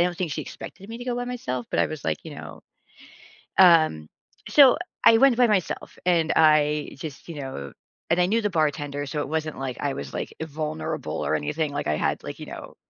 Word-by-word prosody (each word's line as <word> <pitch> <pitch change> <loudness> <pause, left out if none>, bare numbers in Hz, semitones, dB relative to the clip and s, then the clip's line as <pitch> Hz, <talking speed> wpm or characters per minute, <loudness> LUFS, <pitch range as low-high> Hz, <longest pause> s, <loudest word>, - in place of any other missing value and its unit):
I - - +4
don't 180 -1 -2
think 175 -5 -2
she - - -3
expected 195 - -10
me 230 - -6
to 245 - -7
go 245 - -1
by 245 0 -3
myself, 130 - -4
but - - -1
I - - +3
was, 155 -2 -7
like, 80 -1 0
you - - -8
know - - -10 1.0
Um, 160 - +5 0.4
so, 275 -3 +7 0.3
I 225 - +8
went 270 -2 +6
by 250 -1 +5
myself 205 -5 -1
and 165 -3 +3
I 150 -1 +4
just, 155 0 -8
you 165 - -6
know 70 - -7 0.4
and 175 +2 +4
I 180 - +3
knew 225 +3 +2
the 210 - 0
bartender 145 -3 -1
so 150 +2 -4
it 145 - -4
wasn't 155 -1 -3
like 130 -2 -4
I 140 -1 -1
was, 70 - -7
like, - - -4
vulnerable 155 - -4
or - - +1
anything 150 - -2
like 145 - -3
I 75 - +1
had, - - -1
like, - - -7
you - - -7
know, - - -9
155 Hz, 225 wpm, -25 LUFS, 140-185 Hz, 1.0 s, I